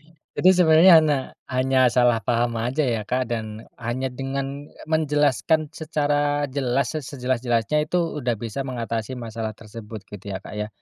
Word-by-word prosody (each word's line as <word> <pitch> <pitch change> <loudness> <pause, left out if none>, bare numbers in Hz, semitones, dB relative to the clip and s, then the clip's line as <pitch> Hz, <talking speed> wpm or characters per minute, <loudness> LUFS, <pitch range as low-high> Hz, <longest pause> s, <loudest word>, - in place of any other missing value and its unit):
Hanya. 150 - -49
Itu 185 - +4
sebenarnya 175 0 +6
hanya, 150 -3 +2 0.3
hanya 130 0 +1
salah 120 -1 +3
paham 115 +1 0
aja 130 +6 0
ya, 115 -4 0
Kak, 130 0 +1
dan 110 -1 -5 0.2
hanya 120 +3 -2
dengan 135 +2 -4 0.2
menjelaskan 155 0 +1
secara 145 -2 0
jelas, 130 -2 0
sejelas-sejelasnya, 130 0 -1
itu 180 - +1 0.2
udah 120 -2 -1
bisa 115 +4 -5
mengatasi 120 -2 -4
masalah 115 -2 -5
tersebut, 110 -1 -10
gitu 100 0 -7
ya, - - -5
Kak, - - -9
ya? 105 - -3
130 Hz, 150 wpm, -23 LUFS, 115-145 Hz, 0.3 s, sebenarnya